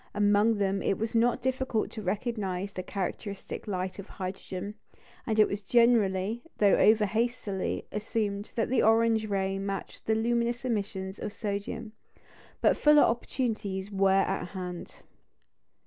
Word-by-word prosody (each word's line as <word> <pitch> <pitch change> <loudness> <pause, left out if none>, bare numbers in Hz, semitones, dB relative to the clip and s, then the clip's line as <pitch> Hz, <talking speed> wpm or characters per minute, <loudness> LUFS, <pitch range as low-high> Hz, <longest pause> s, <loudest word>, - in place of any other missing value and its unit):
Among 205 +2 +4
them 195 -1 0
it 195 - 0
was 225 +1 -3
not 240 +2 +2
difficult 260 -3 -1
to 220 - -6
recognise 200 -1 -2
the 185 - -4
characteristic 195 +2 -5
light 185 -1 -3
of 200 - -8
hydrogen; 190 +1 -6 0.5
and 220 -1 +1
it 215 - +7
was 200 +1 -4
generally, 220 -1 +3 0.2
though 200 -2 +5
over 215 0 +5
hastily, 220 -3 -2
assumed 210 -1 -2
that 225 - 0
the 260 - +3
orange 225 0 +3
ray 195 -1 0
matched 195 0 -5
the 220 - +3
luminous 235 +2 0
emissions 200 -4 -3
of - - -4
sodium. 210 +2 -4 0.7
But - - +4
fuller 300 0 +6
opportunities 215 -5 -1
were 195 -1 +3
at 195 -1 -1
hand. 180 -1 -7
210 Hz, 140 wpm, -29 LUFS, 195-230 Hz, 0.7 s, it